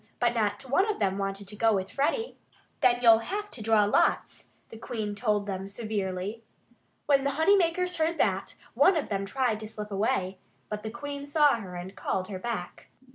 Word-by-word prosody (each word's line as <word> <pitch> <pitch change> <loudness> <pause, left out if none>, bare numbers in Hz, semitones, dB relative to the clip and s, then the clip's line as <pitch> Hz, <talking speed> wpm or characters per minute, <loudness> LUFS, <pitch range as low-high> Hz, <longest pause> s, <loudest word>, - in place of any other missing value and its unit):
But 240 -1 +2
not 220 +2 -1
one 375 - +2
of 425 - -1
them 195 -1 0
wanted 195 0 -3
to 210 - -6
go 225 +1 +3
with 190 -1 -2
Freddie. 450 - -1 0.4
"Then 250 -3 +4
you'll 225 -1 +8
have 415 - -4
to 235 - -9
draw 215 -1 +4
lots," 205 - +1 0.2
the 225 - -10
Queen 215 -3 -4
told 210 -1 0
them 195 -1 -4
severely. 200 0 -3 0.6
When 275 -2 +3
the 280 - +1
honey 385 +6 +5
makers 360 0 +1
heard 325 +1 +1
that, - - 0 0.2
one 375 -2 +5
of 305 - -2
them 195 -1 -2
tried 245 -2 0
to 215 - -7
slip 210 -1 -7
away. 195 -2 -1 0.3
But 210 0 -4
the 220 - -5
Queen 285 +4 -6
saw 295 -1 +4
her 190 -5 -8
and 180 +2 -7
called 185 0 -2
her 190 -2 -5
back. 210 -4 -5
220 Hz, 195 wpm, -28 LUFS, 200-280 Hz, 0.6 s, you'll